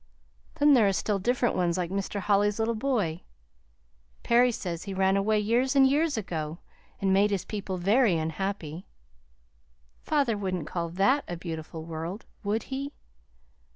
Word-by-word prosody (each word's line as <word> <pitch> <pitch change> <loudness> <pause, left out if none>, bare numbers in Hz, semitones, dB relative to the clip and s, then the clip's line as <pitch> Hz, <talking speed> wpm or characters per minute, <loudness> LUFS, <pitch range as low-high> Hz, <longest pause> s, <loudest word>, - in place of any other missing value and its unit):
Then 295 -2 +5
there 230 -6 +5
are 195 - +2
still 195 +3 0
different 240 +4 +1
ones 175 -1 +1
like 175 -1 -2
Mr. 200 +1 -2
Holly's 205 0 +2
little 225 +1 0
boy. 215 -9 -1 1.0
Perry 245 +1 +4
says 175 -6 -5
he 195 -1 -5
ran 190 0 +3
away 210 +2 +2
years 240 +6 +1
and 270 -1 +7
years 295 +1 +1
ago, 160 -6 -4 0.4
and 195 -1 +2
made 200 +2 +4
his 195 -2 -2
people 200 -3 -4
very 200 +1 +3
unhappy. 160 +1 -4 1.1
Father 280 -7 +1
wouldn't 185 -5 -3
call 170 +1 -3
that 200 - +2
a 175 - -4
beautiful 160 -2 -6
world, 165 +5 -6 0.2
would 210 +2 -1
he? 280 +2 -4
200 Hz, 155 wpm, -27 LUFS, 175-235 Hz, 1.1 s, and